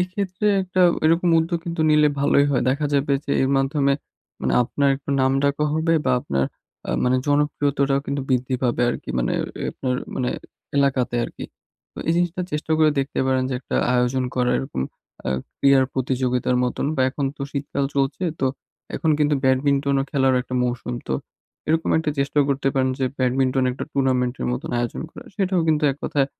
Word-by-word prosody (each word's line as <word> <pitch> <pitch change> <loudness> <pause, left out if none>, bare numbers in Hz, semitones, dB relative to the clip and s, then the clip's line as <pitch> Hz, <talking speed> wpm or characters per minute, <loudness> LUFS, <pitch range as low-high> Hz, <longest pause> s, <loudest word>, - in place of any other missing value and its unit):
এক্ষেত্রে 185 +2 -2 0.2
একটা 185 0 -1 0.2
এরকম 165 +3 +3
উদ্যোগ 165 +1 0
কিন্তু 170 -1 -3
নিলে 150 -1 +5
ভালোই 140 0 +4
হয়। 130 - +1
দেখা 145 +3 +1
যাবে 140 0 +1
যে 140 - -2
এর 130 - +2
মাধ্যমে 140 +1 +2 0.5
মানে - - 0
আপনার 140 +3 0
একটু 140 +1 -8
নাম 130 0 +3
ডাকও 140 +1 +1
হবে 160 +1 +1
বা 130 - +2
আপনার 70 - -1 0.4
আ - - 0
মানে 125 +1 +3
জনপ্রিয়তাটাও 145 -1 +1
কিন্তু 140 0 -2
বৃদ্ধি 130 0 0
পাবে 120 -1 +1
আরকি। - - -7
মানে - - 0 0.3
এ - - -3
আপনার 130 -1 -2 0.2
মানে 125 -1 0 0.5
এলাকাতে 135 -3 +1
আরকি। - - -8 0.5
তো - - -13
এই - - +4
জিনিসটা 175 +1 0
চেষ্টা 150 +1 -2
করে 155 -1 +5
দেখতে 135 +1 -1
পারেন 130 -1 +2
যে - - -1
একটা - - -3 0.2
আয়োজন 125 +1 +1
করা 125 -1 +1
এরকম 135 - -4 0.5
আ - - 0 0.3
ক্রীড়ার 140 -1 +5
প্রতিযোগিতার 125 -1 0
মতন 125 +2 -2
বা, - - 0
এখন 140 +1 -3
তো - - -6
শীতকাল 140 0 -2
চলছে 140 +6 0 0.2
তো 135 - +2 0.5
এখন 160 - 0
কিন্তু 150 0 +3
ব্যাডমিন্টনও 140 +1 +2
খেলার 135 -3 +2
একটা 130 - -7
মৌসুম। 125 0 -2
তো - - 0 0.6
এরকম 160 +1 +1
একটা 155 -2 -1
চেষ্টাও 140 +1 +2
করতে 135 0 +1
পারেন 130 -1 +2
যে 130 - +1
ব্যাডমিন্টন 130 +1 +1
একটা 125 - -5
টুর্নামেন্টের 130 -2 0
মতন 125 - -4
আয়োজন 120 0 -2
করা - - -12
সেটাও 190 -3 +1
কিন্তু 150 -1 +2
এক 135 - -12
কথায় 140 -2 +1
140 Hz, 180 wpm, -22 LUFS, 130-150 Hz, 0.6 s, নিলে